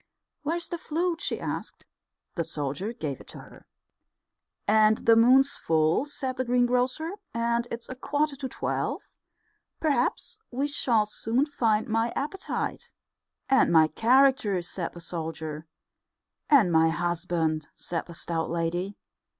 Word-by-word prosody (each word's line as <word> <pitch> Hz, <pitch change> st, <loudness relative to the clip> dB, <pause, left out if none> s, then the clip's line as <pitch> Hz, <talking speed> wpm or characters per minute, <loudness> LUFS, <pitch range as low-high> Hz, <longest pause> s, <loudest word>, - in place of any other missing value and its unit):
"Where's 335 Hz, +3 st, -2 dB
the 345 Hz, -, -5 dB
flute?" 335 Hz, +2 st, -1 dB
she -, -, -1 dB
asked. -, -, -5 dB, 0.5 s
The 170 Hz, -, -1 dB
soldier 150 Hz, +7 st, -3 dB
gave 150 Hz, -, -5 dB
it -, -, -15 dB
to -, -, -10 dB
her. -, -, -14 dB, 1.0 s
"And 215 Hz, 0 st, +5 dB
the 230 Hz, -, +7 dB
moon's 260 Hz, +5 st, +6 dB
full," 160 Hz, -, +2 dB
said 265 Hz, -3 st, -4 dB
the 255 Hz, -, 0 dB
greengrocer, 250 Hz, +5 st, +1 dB, 0.2 s
"and 235 Hz, +1 st, 0 dB
it's 235 Hz, 0 st, -6 dB
a -, -, -5 dB
quarter 290 Hz, +3 st, -1 dB
to 265 Hz, -1 st, -4 dB
twelve. -, -, -3 dB, 0.7 s
Perhaps 290 Hz, -, 0 dB
we 265 Hz, +3 st, -1 dB
shall 240 Hz, -7 st, +2 dB
soon 225 Hz, +5 st, 0 dB
find 225 Hz, -7 st, +1 dB
my 225 Hz, +1 st, +1 dB
appetite." 335 Hz, +7 st, -3 dB, 0.6 s
"And 265 Hz, -, +4 dB
my 160 Hz, -2 st, +6 dB
character," 245 Hz, -, +3 dB
said 175 Hz, -1 st, -3 dB
the 175 Hz, -, -10 dB
soldier. 160 Hz, -2 st, -5 dB, 0.8 s
"And 240 Hz, -, +6 dB
my 160 Hz, 0 st, +5 dB
husband," 165 Hz, -2 st, -1 dB
said 170 Hz, -1 st, -4 dB
the 170 Hz, -, -9 dB
stout 165 Hz, -1 st, -2 dB
lady. 175 Hz, +4 st, -2 dB
225 Hz, 135 wpm, -27 LUFS, 170-265 Hz, 1.0 s, the